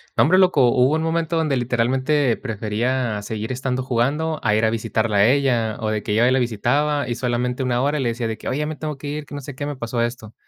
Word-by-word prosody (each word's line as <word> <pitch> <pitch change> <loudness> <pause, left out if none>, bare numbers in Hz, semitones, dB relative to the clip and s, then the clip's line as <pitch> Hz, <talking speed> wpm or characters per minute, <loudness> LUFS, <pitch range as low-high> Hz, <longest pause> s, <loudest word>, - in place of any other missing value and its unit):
No - - +5
hombre, 180 +5 +4
loco, 180 -10 +5
hubo 130 +4 +3
un 160 - 0
momento 165 0 -1
donde 155 -4 +1
literalmente 125 +2 +1
prefería 110 0 -2
seguir 110 +2 -5
estando 130 0 -2
jugando 140 +6 0
a 105 - +2
ir 110 - +1
a 110 - +4
visitarla 110 -1 -1
a 100 +2 +5
ella, 120 -5 +2
o 110 - -1
de 105 -1 -2
que 105 - -1
yo 115 - +3
hoy 125 - +4
la 130 - +3
visitaba 135 +5 0
y 120 - -1
solamente 125 +1 -1
1, 125 -1 0
hora 145 +2 0
le 125 -3 0
decía 115 0 -2
de 110 - -4
que: - - -9
"Oye, 135 - -1
ya 150 - 0
me 155 0 -5
tengo 150 -2 -4
que 145 - -8
ir, 150 +1 -4
que 145 - -9
no 145 - -5
sé 140 +1 -8
qué, 145 +3 -5
me 145 0 -4
pasó 120 -2 -3
esto". 115 -2 -4
125 Hz, 265 wpm, -21 LUFS, 115-145 Hz, -, No